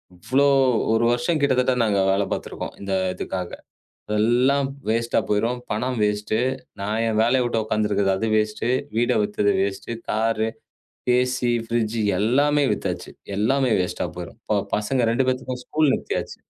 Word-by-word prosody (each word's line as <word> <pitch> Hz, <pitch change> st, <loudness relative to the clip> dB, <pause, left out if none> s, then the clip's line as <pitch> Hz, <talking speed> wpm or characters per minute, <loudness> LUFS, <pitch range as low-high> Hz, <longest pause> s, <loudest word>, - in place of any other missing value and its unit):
இவ்ளோ 130 Hz, +10 st, +1 dB, 0.5 s
ஒரு 115 Hz, +1 st, +2 dB
வருஷம் 120 Hz, +7 st, 0 dB
கிட்டத்தட்ட 130 Hz, -2 st, +3 dB
நாங்க 105 Hz, -3 st, +2 dB
வேலை 100 Hz, +1 st, +1 dB
பாத்துட்டு -, -, -3 dB
இருக்கோம். -, -, -6 dB
இந்த 100 Hz, -1 st, -3 dB, 0.2 s
இதுக்காக. 90 Hz, -1 st, -4 dB, 0.7 s
எல்லாம் 130 Hz, +5 st, +3 dB, 0.2 s
வேஸ்ட்டா 115 Hz, +1 st, +1 dB
போயிரும். 115 Hz, +4 st, 0 dB
பணம் 125 Hz, +3 st, -2 dB
வேஸ்ட்டு. 105 Hz, +1 st, 0 dB, 0.4 s
நான் 105 Hz, +3 st, -1 dB
என் 110 Hz, -1 st, +1 dB
வேலையை 125 Hz, +3 st, +3 dB
விட்டுக் 115 Hz, -2 st, 0 dB
உக்காந்துருக்குறது 105 Hz, -1 st, +1 dB
வேஸ்ட்டு. 110 Hz, +2 st, 0 dB, 0.3 s
வீட்டை 120 Hz, -, +2 dB
வித்தது 105 Hz, 0 st, +1 dB
வேஸ்ட்டு 100 Hz, +4 st, -3 dB
கார், 110 Hz, 0 st, +1 dB, 0.7 s
ஏசி, 125 Hz, -1 st, +1 dB
ஃப்ரிட்ஜ் 115 Hz, -1 st, -1 dB, 0.2 s
எல்லாமே 145 Hz, +6 st, +3 dB
வித்தாச்சு. -, -, -5 dB, 0.3 s
எல்லாமே 130 Hz, +3 st, +2 dB
வேஸ்ட்டா 90 Hz, -, -3 dB
போயிரும். 90 Hz, +5 st, -8 dB, 0.4 s
பசங்க 115 Hz, +3 st, 0 dB
2 130 Hz, +2 st, +1 dB
பேத்துக்கும் 130 Hz, -1 st, -2 dB
ஸ்கூல் 155 Hz, -3 st, +2 dB
நிறுத்தி -, -, -3 dB
ஆச்சு. -, -, -9 dB
115 Hz, 140 wpm, -23 LUFS, 105-125 Hz, 0.7 s, கிட்டத்தட்ட